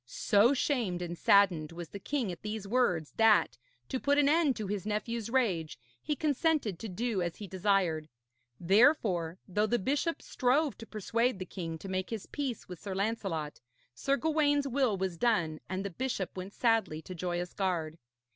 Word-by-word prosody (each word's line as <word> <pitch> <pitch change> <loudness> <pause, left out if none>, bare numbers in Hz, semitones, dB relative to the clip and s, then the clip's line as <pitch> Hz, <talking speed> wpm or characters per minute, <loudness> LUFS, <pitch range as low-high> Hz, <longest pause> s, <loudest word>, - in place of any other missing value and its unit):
So 255 - +3
shamed 230 -11 0
and 175 0 -4
saddened 175 -5 +4
was 170 -1 -7
the 200 - -8
king 250 -2 -2
at 175 - -9
these 210 -1 -5
words 195 -10 +1
that, 225 -1 +4 0.3
to 260 - -1
put 285 +2 +2
an 290 -1 +4
end 300 -3 +3
to 215 - -4
his 200 -1 -3
nephew's 220 +1 -2
rage, 195 - 0 0.2
he 300 - -1
consented 290 - 0
to 225 - -6
do 215 +1 -1
as 175 -1 -2
he 210 - -8
desired. 185 -5 0 0.5
Therefore, 190 - +3
though 210 +3 +1
the 240 - +2
bishop 285 - -1
strove 275 +3 +1
to 225 - -9
persuade 230 +2 0
the 185 - -5
king 165 -3 -5
to 195 - -9
make 185 0 -2
his 225 -4 -5
peace 270 -6 -4
with 180 -2 -9
Sir 195 -2 -5
Lancelot, 195 -7 -2 0.3
Sir 275 - 0
Gawaine's 290 -2 +2
will 255 -6 +1
was 185 -3 -3
done, 170 -10 +1
and 190 +1 -3
the 200 - -3
bishop 235 -2 -3
went 190 +2 -6
sadly 225 -10 +1
to 185 - -8
Joyous 175 0 -3
Gard. 170 -5 -2
205 Hz, 180 wpm, -31 LUFS, 180-250 Hz, 0.5 s, saddened